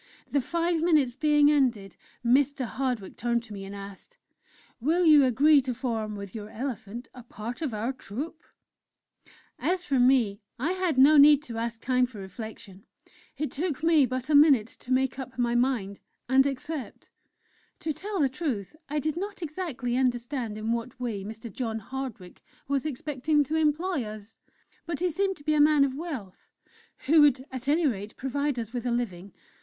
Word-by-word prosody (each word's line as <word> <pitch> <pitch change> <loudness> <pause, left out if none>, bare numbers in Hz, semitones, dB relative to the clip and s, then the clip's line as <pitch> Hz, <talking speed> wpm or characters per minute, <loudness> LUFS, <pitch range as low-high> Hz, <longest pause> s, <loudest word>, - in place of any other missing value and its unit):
The 285 - +2
five 335 +4 0
minutes 300 -8 +3
being 295 0 +4
ended, 240 -10 +1 0.3
Mr. 270 +2 +3
Hardwick 245 -5 -3
turned 235 -1 0
to 220 -2 -10
me 195 -1 -7
and 195 +1 -8
asked: 200 - -11 0.6
"'Will 330 +8 +2
you 300 -3 +7
agree 280 +4 +5
to 255 -2 -3
form, 225 -4 -3
with 200 -2 -8
your 210 -1 -7
elephant, 235 -1 -6
a 250 - -10
part 235 +2 -7
of 300 -5 -1
our 225 +4 -2
Troupe?' 280 - -7 1.2
"As 365 0 0
for 275 -3 +1
me 245 -5 +3 0.2
I 290 +8 -1
had 365 -6 -1
no 290 +4 +7
need 290 0 +7
to 235 -6 -7
ask 230 0 -4
time 250 0 +2
for 240 -3 -13
reflection; 200 0 -9 0.5
it 300 - -2
took 310 -1 -3
me 320 -5 +5
but 255 0 -4
a - - +3
minute 285 -6 +6
to 250 - -9
make 260 +1 +1
up 260 -1 -7
my 240 -1 +1
mind, 240 -6 0 0.3
and 265 +2 +4
accept!... 280 +1 -6 0.7
To 315 -2 -1
tell 400 +4 -4
the 285 - +4
truth, 260 - -4
I 300 - -2
did 305 +1 -1
not 395 +1 -5
exactly 290 -7 -3
understand 245 -3 -1
in 215 +1 -2
what 235 +2 -3
way 225 -6 -3
Mr. 220 +1 -8
John 225 -3 -3
Hardwick 225 -5 -7 0.3
was 280 +1 0
expecting 295 +1 0
to 305 +3 -3
employ 320 0 +1
us; 215 +1 -10 0.5
but 330 -4 -3
he 360 0 +1
seemed 385 +3 0
to 290 - -15
be 305 +1 +1
a 300 - +4
man 300 -1 +5
of 275 -2 0
wealth, 270 - -7 0.6
who 310 +2 +6
would 275 -3 +4
at 260 0 -6
any 315 +3 +3
rate 210 -5 -2
provide 280 +1 -1
us 230 -1 -5
with 245 0 -3
a - - 0
living. 200 -6 -3
260 Hz, 180 wpm, -27 LUFS, 230-300 Hz, 1.2 s, you